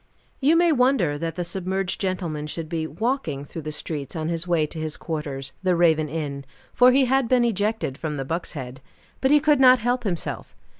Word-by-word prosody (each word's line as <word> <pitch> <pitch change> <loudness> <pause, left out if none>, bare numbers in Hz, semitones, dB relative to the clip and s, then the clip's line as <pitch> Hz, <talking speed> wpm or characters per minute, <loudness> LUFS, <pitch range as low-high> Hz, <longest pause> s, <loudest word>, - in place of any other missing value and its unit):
You 300 +4 +4
may 340 0 +4
wonder 250 - +2
that 165 0 -3
the 175 - -2
submerged 190 +1 -3
gentleman 175 -6 -2
should 160 +1 -5
be 160 0 -2
walking 165 - -2
through 160 - -7
the 155 0 -5
streets, 150 -2 -4
on 160 0 -2
his 170 +1 -3
way 170 -3 +2
to 160 +1 -8
his 155 -1 -4
quarters, 140 -4 -5
the 185 -2 +2
Raven 160 -3 +3
Inn 145 -3 -4 0.3
for 250 +1 +6
he 265 +1 +4
had 265 0 +2
been 250 -2 +4
ejected 210 - -1
from 150 -2 -3
the 135 - -3
Buck's 165 +6 -3
Head 130 -3 -7 0.4
but 265 - +3
he 295 +1 +6
could 300 -2 +3
not 255 -1 +7
help 245 +2 -1
himself. 180 -6 -4
170 Hz, 205 wpm, -24 LUFS, 155-240 Hz, 0.4 s, not